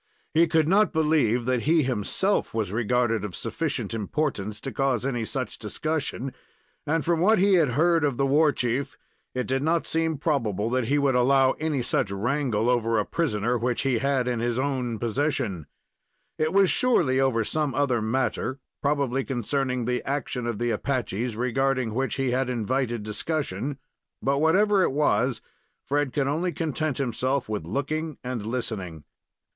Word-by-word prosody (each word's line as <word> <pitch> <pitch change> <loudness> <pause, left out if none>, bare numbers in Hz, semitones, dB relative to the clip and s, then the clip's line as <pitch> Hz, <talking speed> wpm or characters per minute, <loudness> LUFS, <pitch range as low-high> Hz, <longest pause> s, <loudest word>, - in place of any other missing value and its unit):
He 165 +2 +5
could 160 -2 +2
not 200 +3 +4
believe 150 -7 +2
that 125 -1 +1
he 165 -1 +4
himself 130 - 0
was 105 -5 -1
regarded 115 0 +1
of 100 -5 -5
sufficient - - -3
importance 105 -2 -2
to 135 - -5
cause 135 -3 0
any 120 -4 -1
such 130 +2 -4
discussion, 135 +3 -3 0.5
and 160 +2 0
from 170 -1 +2
what 215 +6 +4
he 195 +2 +4
had 155 -9 +3
heard 165 0 +3
of 140 -4 0
the 140 - +2
war 150 +3 +4
chief, 125 +1 -2 0.4
it 125 - -1
did 130 +1 -1
not 165 +3 +1
seem 160 -1 0
probable 115 - -1
that 130 -1 +1
he 145 - +2
would 140 -2 +2
allow 130 +1 +4
any 150 -5 -1
such 110 - 0
wrangle 115 +2 0
over 115 -2 +2
a 105 - +1
prisoner 120 -7 0
which 120 +1 -1
he 130 -4 +1
had 135 -1 +1
in 120 -2 0
his 120 0 -1
own 130 -4 -1
possession. 120 - -1 0.7
It 185 +5 +4
surely 170 - +3
was 135 - +3
over 115 -4 +2
some 150 +2 -1
other 130 -4 +1
matter, 130 +3 -1 0.2
probably 140 -2 0
concerning 130 0 -1
the 125 +1 0
action 135 -3 -3
of 120 -3 -2
the 120 +1 0
Apaches, 120 -3 -2
regarding 125 0 0
which 130 +3 -1
he 135 -2 0
had 130 +1 0
invited 120 -1 -1
discussion; 135 - -3 0.4
but 140 +1 0
whatever 195 +5 +4
it 155 - +2
was, 125 -4 +1 0.4
Fred 145 -1 0
could 135 +3 0
only 165 +6 0
content 155 -3 -2
himself 130 +1 -1
with 105 -6 -3
looking 150 - -3
and 125 -4 -4
listening. 100 -10 -4
130 Hz, 165 wpm, -26 LUFS, 120-150 Hz, 0.7 s, He